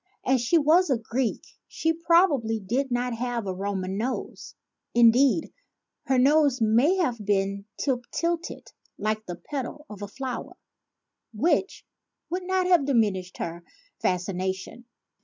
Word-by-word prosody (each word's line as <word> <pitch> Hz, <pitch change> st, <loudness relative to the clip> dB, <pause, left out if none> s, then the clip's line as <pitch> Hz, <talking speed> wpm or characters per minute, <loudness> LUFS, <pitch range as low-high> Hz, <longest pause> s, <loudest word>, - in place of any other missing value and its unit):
As 260 Hz, -2 st, +3 dB
she 255 Hz, +8 st, +3 dB
was 325 Hz, +4 st, +4 dB
a 260 Hz, -, +3 dB
Greek 230 Hz, +2 st, -2 dB, 0.2 s
she 325 Hz, 0 st, 0 dB
probably 325 Hz, -9 st, +3 dB
did 245 Hz, +8 st, -1 dB
not 245 Hz, 0 st, -1 dB
have 240 Hz, -1 st, -3 dB
a 190 Hz, -, -2 dB
Roman 190 Hz, 0 st, -3 dB
nose; 250 Hz, +3 st, -4 dB, 0.4 s
indeed 245 Hz, +6 st, +4 dB, 0.5 s
her 265 Hz, -, +3 dB
nose 280 Hz, 0 st, +4 dB
may 235 Hz, -, +4 dB
have 250 Hz, -, -1 dB
been 200 Hz, 0 st, 0 dB
"tip 250 Hz, -4 st, -1 dB
til 340 Hz, 0 st, 0 dB
ted 345 Hz, -, -10 dB, 0.3 s
like 215 Hz, +1 st, -1 dB
the 175 Hz, -, -4 dB
petal 285 Hz, -, -6 dB
of 205 Hz, -1 st, -9 dB
a 205 Hz, -, -4 dB
flower," 255 Hz, +2 st, -6 dB, 0.8 s
which 330 Hz, -, 0 dB, 0.5 s
would 365 Hz, +2 st, -1 dB
not 375 Hz, -1 st, +1 dB
have 350 Hz, -6 st, +3 dB
diminished 205 Hz, -8 st, +1 dB
her 170 Hz, +1 st, -5 dB, 0.4 s
fascination. 190 Hz, +5 st, -2 dB
245 Hz, 140 wpm, -26 LUFS, 205-295 Hz, 0.8 s, was